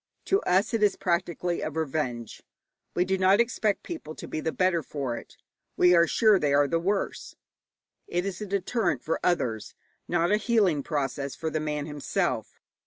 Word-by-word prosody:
To 390 +1 +2
us 190 +6 +2
it 225 - +1
is 210 -2 +4
practically 175 -1 -1
a - - -2
revenge. 140 -7 -3 0.5
We 180 - +2
do 190 0 0
not 190 +2 +5
expect 225 -3 +1
people 320 - -7
to - - -8
be - - -4
the 160 +1 -1
better 185 -2 +1
for 135 -4 -4
it. - - -11 0.4
We 180 0 +6
are 170 -1 +5
sure 215 -1 +4
they 145 -3 +2
are 145 0 +4
the 165 +3 0
worse. 195 +3 -2 0.7
It 175 +2 -1
is 195 0 -4
a 210 - -4
deterrent 200 +4 -1
for 165 - -1
others, 120 -11 -1 0.3
not 175 +1 +1
a 210 - +5
healing 210 - +2
process 140 -2 -3
for 160 +4 -3
the 155 - -1
man 150 -1 -2
himself. 150 -2 -2
175 Hz, 180 wpm, -27 LUFS, 150-195 Hz, 0.7 s, We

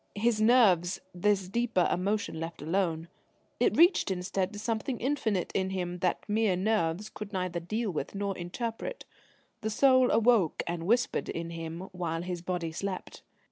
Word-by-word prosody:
His 215 +1 +1
nerves 195 -7 +4
this 190 +1 +1
deeper 230 -3 +1
emotion 195 -2 -1
left 165 -2 -6
alone: 165 -1 0 0.5
it - - +2
reached 345 - +5
instead 185 +1 -1
to 210 - -8
something 225 +3 -2
infinite 230 -8 0
in 190 -1 0
him 180 -2 -3
that 180 0 -1
mere 210 -2 +2
nerves 195 -1 0
could 210 -1 -8
neither 180 -3 -2
deal 215 +5 -2
with 155 +2 -4
nor 200 -1 -2
interpret. 225 - -5 0.6
The 220 - -1
soul 255 +3 +5
awoke 225 -7 +3
and 170 0 -3
whispered 240 +3 +1
in 170 0 -4
him 165 0 -6
while 170 -2 -3
his 175 -1 -4
body 175 -2 -3
slept. 185 +3 -5
190 Hz, 155 wpm, -29 LUFS, 175-220 Hz, 0.6 s, reached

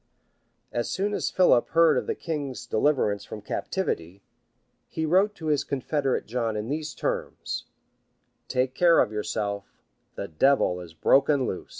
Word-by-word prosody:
[] - - -46
As 120 -1 -2
soon 200 +2 -1
as - - -1
Philip 180 -10 +4
heard 165 0 +5
of - - -1
the 450 - -1
king's 145 - -4
deliverance 110 -4 +1
from 105 0 -9
captivity, 100 - -3 0.6
he 160 - -3
wrote 190 +6 +3
to 160 - -9
his 150 -2 +2
confederate 140 0 -1
John 115 -2 -2
in 105 +3 -4
these 155 +1 -3
terms: - - -3 0.8
"Take 130 0 0
care 170 +3 +5
of - - +3
yourself: 105 -1 -4 0.3
the - - -4
devil 90 - +2
is 85 -2 -12
broken 135 - +3
loose." 95 - -5
135 Hz, 155 wpm, -26 LUFS, 105-155 Hz, 0.8 s, heard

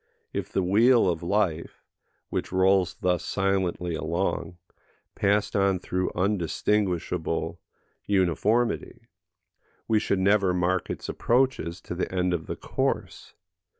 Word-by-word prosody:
If - - -4
the 95 - 0
wheel 115 +5 +4
of 85 -3 0
life, 85 -3 -1 0.5
which - - -3
rolls 95 -1 +3
thus 90 -1 +1
silently 95 -3 -1
along, 85 +2 -2 0.6
passed 100 0 +1
on 100 -1 +3
through 90 +1 -2
undistinguishable 90 -3 -1 0.5
uniformity, 100 +6 +1 0.8
we 110 -1 +3
should 100 - 0
never 95 -1 +3
mark 90 0 0
its - - -5
approaches 120 -9 0
to - - -6
the 90 - -3
end 90 -1 0
of 80 -2 -3
the - - -3
course. - - -3
95 Hz, 115 wpm, -26 LUFS, 90-100 Hz, 0.8 s, wheel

